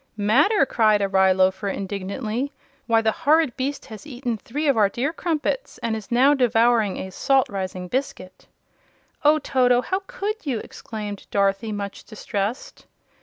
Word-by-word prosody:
"Matter!" 275 - +3
cried 215 -5 +3
a - - +2
rye 190 -1 +4
loafer, 190 +1 +2
indignantly, 205 +7 -3 0.4
"why 225 -1 +4
the 220 - +3
horrid 300 0 +2
beast 275 +2 -3
has 220 +5 -11
eaten 245 -3 -3
three 285 +8 -4
of 280 - +4
our 210 -3 +4
dear 265 +9 -2
Crumpets, 340 +10 -2
and 230 -1 0
is 215 -3 -8
now 260 +4 +5
devouring 235 -5 +2
a 190 - -6
Salt 270 +7 +2
rising 185 -2 -4
Biscuit!" 185 -6 -5 0.8
"Oh, 300 +1 +5
Toto! 250 -4 +2
How 375 +1 -1
could 440 -3 -4
you?" 270 -6 -1
exclaimed 210 -2 -7
Dorothy, 200 +2 0
much 200 -1 -5
distressed. 210 +1 -5
230 Hz, 155 wpm, -23 LUFS, 200-275 Hz, 0.8 s, now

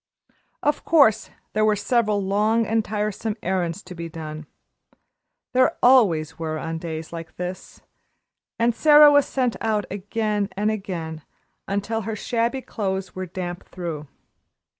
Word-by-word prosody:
Of 295 0 +1
course 280 -10 +4 0.2
there 215 - +2
were 215 -1 +4
several 215 -1 +1
long 215 +4 +2
and 225 +1 +1
tiresome 210 +1 -2
errands 180 0 -1
to - - -10
be 170 -1 -6
done, 155 -2 -7 1.1
there 255 0 +3
always 195 - +4
were 155 -1 -3
on 165 +1 -4
days 160 -1 -6
like 165 -1 -8
this, 180 +1 -7 0.7
and 235 +1 +2
Sara 295 +3 +7
was 285 -1 +4
sent 250 -3 0
out 215 -2 0
again 205 +1 -1
and 210 +2 +1
again, 170 -6 -5 0.5
until 205 +3 -1
her 220 0 -4
shabby 235 +4 -1
clothes 190 -3 -3
were 185 0 -5
damp 175 0 -6
through. 165 -5 -5
205 Hz, 140 wpm, -23 LUFS, 175-225 Hz, 1.1 s, Sara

